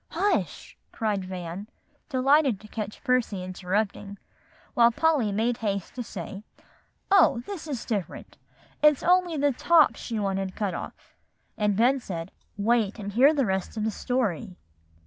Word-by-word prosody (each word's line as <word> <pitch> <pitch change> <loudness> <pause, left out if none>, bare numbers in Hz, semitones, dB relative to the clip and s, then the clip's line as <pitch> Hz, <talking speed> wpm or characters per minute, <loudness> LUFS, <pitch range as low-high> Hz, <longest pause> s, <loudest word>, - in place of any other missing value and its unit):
"Hush!" 410 +1 -1 0.2
cried 210 -3 -1
Van, 185 +1 -6 0.4
delighted 270 -3 +3
to 215 - -13
catch 210 -1 -6
Percy 250 -8 0
interrupting, 195 +2 -3 0.6
while 235 -1 +6
Polly 285 -5 +2
made 225 +4 0
haste 200 -4 -3
to 250 - -5
say, 195 -2 -7 0.7
"Oh! 380 -11 +5
this 375 -6 -7
is 270 -7 -4
different. 205 -6 -5 0.4
It's 300 -2 +4
only 360 -2 +3
the 285 0 +2
tops 320 +5 +4
she 230 - -4
wanted 195 -2 -2
cut 205 -4 -2
off;" - - -8 0.4
and 210 -2 0
Ben 255 +4 +4
said, 175 -6 -6 0.3
"Wait, 220 0 +1
and 205 -2 -5
hear 265 +7 +6
the 285 -4 +1
rest 190 +2 -2
of 215 - -1
the 220 - 0
story." 215 -5 -2
220 Hz, 145 wpm, -26 LUFS, 195-260 Hz, 0.7 s, while